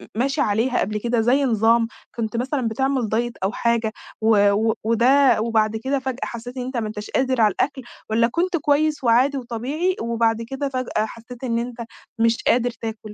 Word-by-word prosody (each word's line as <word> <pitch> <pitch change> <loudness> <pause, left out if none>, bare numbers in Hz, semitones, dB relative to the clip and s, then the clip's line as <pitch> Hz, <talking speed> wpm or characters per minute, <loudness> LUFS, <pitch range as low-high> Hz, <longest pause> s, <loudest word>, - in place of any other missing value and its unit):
ماشي 275 +5 0
عليها 230 +2 +1
قبل 210 +2 -1
كده 235 0 0
زي 260 +5 +3
نظام 230 0 +3 0.3
كنت 230 0 -3
مثلًا 255 -1 -1
بتعمل 260 0 0
diet 240 +1 0
أو 195 - +1
حاجة 235 -2 0 0.3
و 205 -2 +4
و 220 +2 +2
وده 245 +2 +4
وبعد 220 -1 +1
كده 270 +1 0
فجأة 260 -1 -4
حسيت 245 +2 -7
إن 250 - -2
أنت 260 -1 -4
ما 220 -2 -1
أنتاش 210 0 -7
قادر 260 -2 +1
على 210 -2 +5
الأكْل، 270 +6 -2 0.3
والّا 230 +1 +3
كنت 345 +6 0
كويس 300 0 +1
وعادي 255 +4 +3
وطبيعي 270 +10 -2
وبعد 230 -1 +1
كده 270 +4 -4
فجأة 255 -4 -1
حسيت 235 +3 -11
إن 230 -2 0
أنت 240 0 -5 0.4
مش 230 0 +2
قادر 245 0 +3
تاكل؟ 220 -2 -7
235 Hz, 185 wpm, -22 LUFS, 225-265 Hz, 0.4 s, على